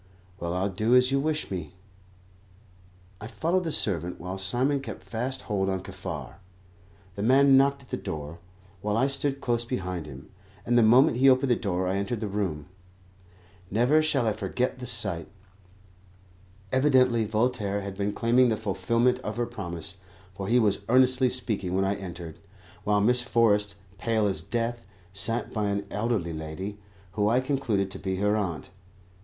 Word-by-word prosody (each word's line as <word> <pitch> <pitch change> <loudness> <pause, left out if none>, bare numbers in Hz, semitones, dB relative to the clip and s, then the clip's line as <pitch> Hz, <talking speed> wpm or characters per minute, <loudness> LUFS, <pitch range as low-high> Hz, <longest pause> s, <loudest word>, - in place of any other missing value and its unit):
Well, 85 +1 -3
I'll 95 +2 0
do 110 +6 +2
as 125 +1 +5
you 135 - +2
wish 155 -2 -2
me." 90 -1 -5 1.5
I 110 - -6
followed 170 +8 0
the 160 - -1
servant, 90 - 0
while 90 +2 -5
Simon 125 +9 0
kept 125 -5 -8
fast 130 +4 -3
hold 95 -3 -1
on 95 -1 -2
Kaffar. 90 -9 -7 0.8
The 100 - -6
man 135 +4 +5
knocked 140 +1 +3
at 130 - -21
the - - -1
door, 75 +2 -6 0.4
while 105 +1 -1
I 130 - +3
stood 140 0 0
close 120 -1 0
behind 90 -9 -4
him, 70 -2 -11 0.3
and 120 - +1
the 120 - +6
moment 120 +4 +5
he 135 +2 +6
opened 130 0 +3
the - - +5
door 95 -5 -2
I 95 +2 0
entered 100 +3 -2
the 110 - -3
room. 95 -7 -3 1.0
Never 125 +9 +3
shall 140 -5 +1
I 110 - +2
forget 125 +4 -2
the 125 - -5
sight. 105 -8 +2 1.4
Evidently 130 -4 +4
Voltaire 105 -2 0
had 100 -1 -6
been 100 +1 -1
claiming 120 +4 +3
the 110 - 0
fulfilment 115 +5 +1
of 110 -3 -5
her 120 - 0
promise, 95 -6 -6 0.4
for 95 0 -6
he 120 +4 +3
was 105 -4 +2
earnestly 130 +1 +5
speaking 110 -8 -2
when 95 0 +2
I 100 - +1
entered, 85 -5 -8 0.5
while 105 0 +2
Miss 125 +4 +3
Forrest, 105 -4 +2 0.2
pale 110 -2 +1
as 95 -6 -1
death, 120 +5 -2 0.3
sat 110 +5 -2
by 105 -2 -1
an 100 0 -2
elderly 105 -6 -1
lady, 80 +6 -6 0.3
who 105 +1 +1
I 120 +3 +3
concluded 130 -8 -1
to - - -4
be 95 -1 -2
her 105 +2 +1
aunt. 90 -6 -3
110 Hz, 170 wpm, -27 LUFS, 95-125 Hz, 1.5 s, the